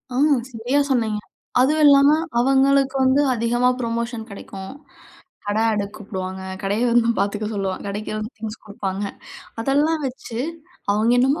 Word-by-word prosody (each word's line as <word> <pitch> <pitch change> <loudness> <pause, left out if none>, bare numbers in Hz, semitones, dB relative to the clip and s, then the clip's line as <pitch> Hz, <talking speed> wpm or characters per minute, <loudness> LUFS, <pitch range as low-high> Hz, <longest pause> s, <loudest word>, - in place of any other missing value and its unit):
ஆமா. 295 +3 +4 0.2
சரியா 245 +5 0
சொன்னீங்க. 220 -4 +1 0.4
அதுவும் 300 +5 +3
இல்லாம 280 0 +7 0.3
அவங்களுக்கு 270 +1 +3
வந்து 260 +2 +4
அதிகமா 240 +1 +2
ப்ரொமோஷன் 230 -1 -3
கிடைக்கும். 195 0 -8 0.7
கட 205 +1 -1
அடக்கு 205 -1 -2
கூப்பிடுவாங்க 190 -3 -6 0.2
கடைய 205 +4 0
வந்து 235 -1 +4
பாத்துக்க 205 +1 -1
சொல்லுவாங்க 195 -2 -3
கடைக்கு 205 +2 -4
வந்து 215 +2 -5
திங்ஸ் 220 0 -7
குடுப்பாங்க. 200 -2 -4 0.6
அதெல்லாம் 295 +5 +1
வச்சு 245 -3 -6 0.5
அவங்க 215 +3 +2
என்னமோ 270 +5 +3
230 Hz, 130 wpm, -22 LUFS, 205-265 Hz, 0.7 s, இல்லாம